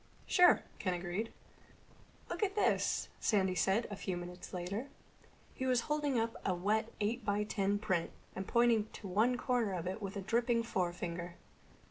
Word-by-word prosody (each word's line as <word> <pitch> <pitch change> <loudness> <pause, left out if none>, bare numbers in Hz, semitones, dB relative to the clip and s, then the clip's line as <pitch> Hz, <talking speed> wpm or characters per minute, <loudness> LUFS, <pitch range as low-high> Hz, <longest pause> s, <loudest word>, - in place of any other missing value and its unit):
"Sure," 360 -1 +6 0.2
Ken 185 -2 0
agreed. 180 +5 -3 1.0
"Look - - -4
at 400 -1 +1
this," 420 - +2
Sandy 190 -4 +2
said 195 +6 +2
a - - -3
few 190 -2 -3
minutes 180 +1 -8
later. 190 +8 -3 0.7
He 260 - -3
was 250 -2 +3
holding 295 -2 0
up 225 0 -1
a 185 - +1
wet 215 +5 0
eight 220 +4 0
by 205 0 +1
ten 200 -1 0
print 185 -5 0 0.3
and 190 0 -4
pointing 235 -2 +3
to 205 - -8
one 220 +7 +3
corner 240 -6 +1
of 175 -3 -3
it 190 +4 -3
with 195 0 -4
a - - -3
dripping 230 +3 +2
forefinger. 175 -4 -2
205 Hz, 165 wpm, -34 LUFS, 185-235 Hz, 1.0 s, Sure